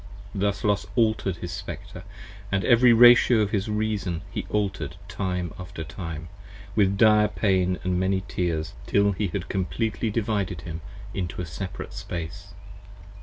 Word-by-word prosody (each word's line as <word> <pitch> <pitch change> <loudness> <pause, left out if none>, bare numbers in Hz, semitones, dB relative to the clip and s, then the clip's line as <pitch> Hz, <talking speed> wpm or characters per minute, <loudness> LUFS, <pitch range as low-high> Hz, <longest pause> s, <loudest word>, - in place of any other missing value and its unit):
50 - - -4
Thus 100 -1 0
Los 105 -1 +1
alter'd 110 -5 +2
his 85 0 -6
Spectre, - - -7 0.3
& 100 0 -17
every 115 +6 +5
Ratio 120 0 +7
of 100 -1 0
his 100 -1 -1
Reason 105 -5 -1
He - - -4
alter'd 95 -8 -1
time 90 -3 -3
after 90 -2 -6
time, 85 -1 -6 0.5
with 100 -2 +3
dire 105 -1 +6
pain 95 -4 +1
& - - -17
many 95 +1 +1
tears, 85 -1 -2
Till 100 0 +3
he 100 +1 -1
had 95 +1 -4
completely 110 +4 -1
divided 105 -6 -1
him 80 -1 -6 0.3
into 90 -3 -4
a 90 - -2
separate 95 +5 -6
space. 90 -1 -6
95 Hz, 150 wpm, -25 LUFS, 90-105 Hz, 0.5 s, Ratio